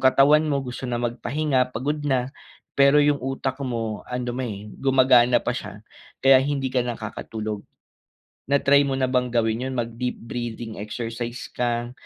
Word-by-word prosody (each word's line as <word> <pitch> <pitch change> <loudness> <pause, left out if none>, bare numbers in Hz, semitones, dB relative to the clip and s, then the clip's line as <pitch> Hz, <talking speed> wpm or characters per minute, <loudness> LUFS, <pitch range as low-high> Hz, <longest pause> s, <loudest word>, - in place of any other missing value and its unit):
katawan 145 +4 +5
mo 140 -2 0
gusto 125 0 -6
na 120 - -1
magpahinga, 130 +3 0
pagod 145 +5 -2
na, 135 -3 -1 0.4
pero 140 +1 +5
'yung 145 -1 +2
utak 135 +1 -3
mo, 115 -5 -3
ando'n, 125 0 -3
eh, 100 -3 -5 0.2
gumagana 130 -2 +5
pa - - 0
siya, - - -7 0.4
kaya 135 -1 +8
hindi 135 -1 -1
ka 130 - +2
nakakatulog. 110 -2 -5 0.9
Na-try 140 +1 +4
mo 135 - -1
na 130 - +2
bang 125 -1 +2
gawin 115 0 +1
'yun, 130 - -4
mag-deep 120 +1 -3
breathing 115 -1 -5
exercise 115 +3 -5
ka 120 0 -1
125 Hz, 150 wpm, -24 LUFS, 120-135 Hz, 0.9 s, kaya